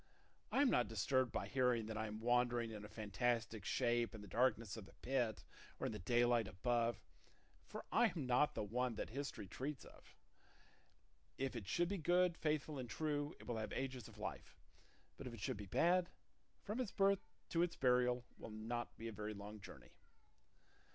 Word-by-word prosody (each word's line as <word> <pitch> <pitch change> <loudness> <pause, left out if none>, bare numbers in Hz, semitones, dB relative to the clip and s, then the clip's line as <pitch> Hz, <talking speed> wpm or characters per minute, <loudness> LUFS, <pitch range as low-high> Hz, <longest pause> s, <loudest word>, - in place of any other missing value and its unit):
I 280 - +5
am 270 - +5
not 120 - +3
disturbed 125 +4 +2
by - - -2
hearing 125 -4 +2
that 110 0 -4
I 110 0 -1
am 105 +1 -5
wandering 120 -1 +2
in 105 -1 -6
a 105 - -8
fantastic 110 +1 -1
shape 120 0 +1
in 110 - -8
the - - -9
darkness 115 0 +2
of 110 -4 -8
the - - -16
pit 120 -4 -1 0.4
or - - -1
in - - 0
the - - -4
daylight 120 +2 +3
above, 115 +4 +1 0.7
for - - -7
I 240 +1 +6
am 175 -8 -3
not 125 +4 +3
the - - -1
one 120 +3 0
that 105 - -4
history 140 -4 -4
treats 135 +8 -4
of. - - -16 1.2
If 135 -1 -1
it 110 -6 -5
should 175 0 +2
be 200 -1 -1
good, 175 +2 +4
faithful, 150 -2 0
and 125 -2 -5
true, 145 +3 -1
it - - -12
will 120 -2 -2
have 110 - -3
ages 130 -4 -3
of - - -14
life; - - -6 0.6
but 135 - -6
if 120 - -6
it - - -10
should 125 +6 -1
be 105 -1 -7
bad, 175 - +3 0.5
from 210 +4 -3
its 245 -6 -1
birth 195 0 +3 0.3
to 165 - +2
its 175 -1 +1
burial 125 -1 +3
will - - -7
not 115 +3 -4
be 115 - -5
a - - -3
very 105 0 -4
long 105 +1 -7
journey." 100 - -11
120 Hz, 195 wpm, -40 LUFS, 110-140 Hz, 1.2 s, I